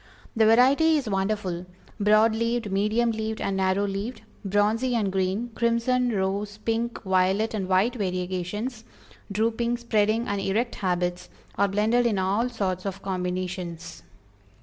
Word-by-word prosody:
The 220 Hz, -1 st, +4 dB
variety 275 Hz, +8 st, +5 dB
is 275 Hz, -5 st, -3 dB
wonderful 190 Hz, -3 st, -2 dB, 0.3 s
"broad 215 Hz, +2 st, +4 dB
leaved, 230 Hz, -1 st, -1 dB
medium 215 Hz, +4 st, +1 dB
leaved 220 Hz, 0 st, -3 dB
and 195 Hz, -, -1 dB
narrow 190 Hz, +1 st, +1 dB
leaved; 200 Hz, +5 st, -4 dB, 0.2 s
bronzy 210 Hz, +5 st, +1 dB
and 205 Hz, -4 st, 0 dB
green, 190 Hz, +5 st, -1 dB
crimson, 235 Hz, +2 st, +1 dB
rose, 200 Hz, 0 st, -2 dB
pink, 230 Hz, +2 st, -2 dB
violet 190 Hz, +4 st, +1 dB
and 195 Hz, -4 st, -2 dB
white 190 Hz, +6 st, +2 dB
variegations; 190 Hz, +3 st, -3 dB, 0.5 s
drooping, 230 Hz, +3 st, 0 dB
spreading, 225 Hz, -1 st, +1 dB
and 200 Hz, -1 st, -1 dB
erect 220 Hz, +5 st, 0 dB
habits, 180 Hz, -1 st, -1 dB, 0.3 s
are 200 Hz, +1 st, +2 dB
blended 220 Hz, +5 st, +2 dB
in 215 Hz, -4 st, 0 dB
all 200 Hz, +6 st, +1 dB
sorts 190 Hz, -5 st, -2 dB
of 195 Hz, 0 st, -6 dB
combinations." 180 Hz, -2 st, -4 dB
210 Hz, 135 wpm, -25 LUFS, 190-230 Hz, 0.5 s, variety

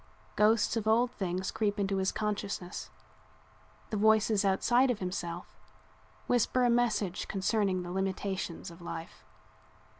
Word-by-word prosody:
Ghosts 215 Hz, +2 st, +3 dB
of 220 Hz, -2 st, -2 dB
old 235 Hz, +3 st, +3 dB
things 185 Hz, -1 st, -3 dB
creep 210 Hz, -1 st, 0 dB
into 195 Hz, -1 st, 0 dB
his 190 Hz, 0 st, +1 dB
consciousness; 205 Hz, -4 st, -3 dB, 1.0 s
the 215 Hz, -, -1 dB
voices 215 Hz, 0 st, +4 dB
outside 240 Hz, +7 st, +3 dB
of 245 Hz, -, +1 dB
himself 180 Hz, -2 st, -5 dB, 0.7 s
whisper 245 Hz, +1 st, +2 dB
a 245 Hz, -, +4 dB
message 220 Hz, -6 st, 0 dB
concerning 195 Hz, -2 st, 0 dB
the 175 Hz, -, -6 dB
limitations 190 Hz, -1 st, -3 dB
of 170 Hz, +1 st, -14 dB
life. 165 Hz, -1 st, -7 dB
200 Hz, 125 wpm, -31 LUFS, 185-220 Hz, 1.0 s, voices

